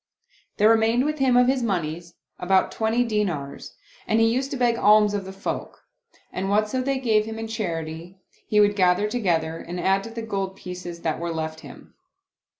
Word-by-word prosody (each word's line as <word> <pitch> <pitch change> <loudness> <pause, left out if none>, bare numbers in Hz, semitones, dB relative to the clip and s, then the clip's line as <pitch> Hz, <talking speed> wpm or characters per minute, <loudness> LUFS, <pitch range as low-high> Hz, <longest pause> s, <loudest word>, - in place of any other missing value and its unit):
There 210 - +5
remained 225 +3 +3
with 305 0 -2
him 260 -2 +3
of 250 - +6
his 260 0 +1
moneys 170 -5 -3 0.2
about 190 +1 +2
twenty 225 +2 +1
dinars 195 -12 -3 0.3
and 220 - +2
he 225 - +5
used 265 +2 -1
to 275 - -4
beg 240 -2 +2
alms 210 -1 +4
of 200 -2 -3
the 190 - -7
folk, 195 +1 -6 0.5
and 190 +1 -2
whatso 215 +5 +1
they 270 +1 -1
gave 220 -5 +2
him 220 0 -6
in 225 0 -5
charity 170 -4 -5 0.3
he 210 - +2
would 205 0 +4
gather 185 +1 +3
together 170 -8 -1
and 175 +1 -6
add 195 +2 +2
to - - -7
the 230 0 -6
gold 195 -3 -3
pieces 180 -2 -8
that 160 -2 -2
were 170 0 -3
left 160 -1 -4
him. - - -13
205 Hz, 190 wpm, -24 LUFS, 175-225 Hz, 0.5 s, of